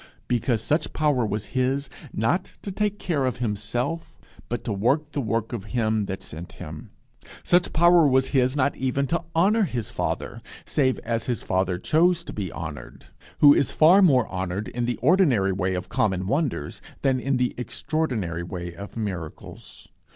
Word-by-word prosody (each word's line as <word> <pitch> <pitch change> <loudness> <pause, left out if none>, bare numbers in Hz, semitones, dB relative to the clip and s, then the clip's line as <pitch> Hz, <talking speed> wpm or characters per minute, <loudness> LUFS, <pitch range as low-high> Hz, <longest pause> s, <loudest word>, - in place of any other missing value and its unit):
Because 120 -1 0
such 150 +7 0
power 150 -5 +2
was 105 0 -3
his, 135 +2 0 0.2
not 125 - 0
to 200 - -4
take 205 +1 -1
care 170 -8 -1
of 130 -2 -1
himself, 120 +8 -3 0.3
but 120 - -3
to 110 - -2
work 140 +10 +1
the 145 - -2
work 115 0 -2
of 110 -4 -4
him 110 -3 +1
that 95 -1 -5
sent 80 +3 -9
him. - - -9 0.5
Such 175 0 +3
power 170 -1 +5
was 130 -1 +3
his 130 -1 +2
not 140 0 +1
even 130 +1 0
to 170 +4 -1
honour 200 +7 +4
his 125 - -2
Father - - -3 0.2
save 130 -3 +1
as 115 -1 -2
his 120 -5 -2
Father 95 -1 0
chose 170 - +2
to - - -8
be 95 -5 -4
honoured, 75 -3 -8 0.4
who 145 -1 +9
is 140 - +2
far 170 +8 +6
more 130 - +5
honoured 95 +2 -3
in 120 +3 -2
the 120 0 -1
ordinary 135 - +4
way 95 0 -1
of 90 0 -4
common 95 -3 0
wonders, 135 - -2 0.2
than 130 -2 +2
in 135 +1 0
the 125 0 0
extraordinary 120 - -2
way 85 0 -6
of 100 +6 -9
miracles. 95 -8 -7
125 Hz, 175 wpm, -25 LUFS, 100-150 Hz, 0.5 s, who